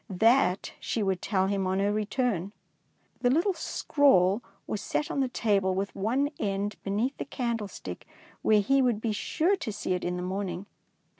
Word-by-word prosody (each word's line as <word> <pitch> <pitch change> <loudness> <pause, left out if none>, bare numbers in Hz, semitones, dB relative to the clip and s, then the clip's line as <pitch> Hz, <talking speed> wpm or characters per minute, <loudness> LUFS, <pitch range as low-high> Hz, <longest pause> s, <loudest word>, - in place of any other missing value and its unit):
That 220 0 +3
she 225 - -1
would 190 -2 0
tell 190 -3 +1
him 195 -1 0
on 190 +1 0
her 200 +1 +1
return. 210 -3 -1 0.7
The 245 - +3
little 340 +9 +3
scrawl 245 - +3 0.2
was 210 - -3
set 300 - -2
on - - -1
the 265 - +2
table 200 -6 +1
with 195 +1 -2
one 255 +9 0
end 200 0 -1
be - - -6
neath 230 +7 0
the - - -4
candlestick, 235 -6 -4 0.3
where 215 -1 +4
he 270 +6 +3
would 245 -5 +2
be 220 0 -1
sure 330 - +1
to 230 - -4
see 205 -2 -2
it 180 - -2
in 180 0 -1
the 180 - -3
morning. 185 0 -3
210 Hz, 180 wpm, -28 LUFS, 195-250 Hz, 0.7 s, where